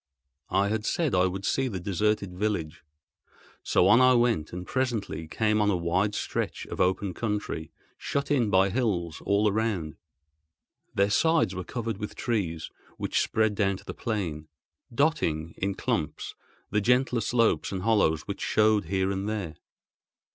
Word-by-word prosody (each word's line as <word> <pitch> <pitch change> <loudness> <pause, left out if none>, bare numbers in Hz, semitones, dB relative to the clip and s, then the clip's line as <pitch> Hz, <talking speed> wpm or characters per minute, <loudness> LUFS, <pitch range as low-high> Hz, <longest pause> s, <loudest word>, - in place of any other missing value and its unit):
I 100 +1 +2
had 110 0 -1
said 160 +4 0
I 90 0 +4
would 95 +2 -4
see 135 +4 +1
the 100 -7 -4
deserted 100 +1 0
village, 90 -6 -2 0.8
so 90 - +3
on 115 +5 +6
I 130 0 +6
went, 120 -10 +1
and 90 +1 -6
presently 115 -11 -2
came 105 +5 +1
on 105 - +3
a 95 - +2
wide 90 +5 0
stretch - - -3
of - - -4
open 95 +1 +1
country, 105 -7 -3 0.3
shut 140 +1 -2
in 125 -7 +2
by 95 0 +4
hills 95 -9 -1
all 100 +1 +3
around. 100 -7 -1 1.0
Their 100 +1 +2
sides 160 - +3
were 90 0 -4
covered 115 0 -4
with 105 - -5
trees 90 -9 -2 0.3
which - - 0
spread 110 -1 +1
down 100 -2 +1
to - - -16
the - - -6
plain, 85 -9 -3 0.4
dotting, 115 - 0
in 100 +1 -2
clumps, 110 - -2 0.4
the 105 - +2
gentler 125 +1 +2
slopes 115 +1 +1
and 95 -2 -3
hollows 100 -8 +2
which - - -6
showed 110 -2 +3
here 95 +2 0
and 100 +1 -2
there. 100 -7 -3
100 Hz, 160 wpm, -27 LUFS, 90-115 Hz, 1.0 s, on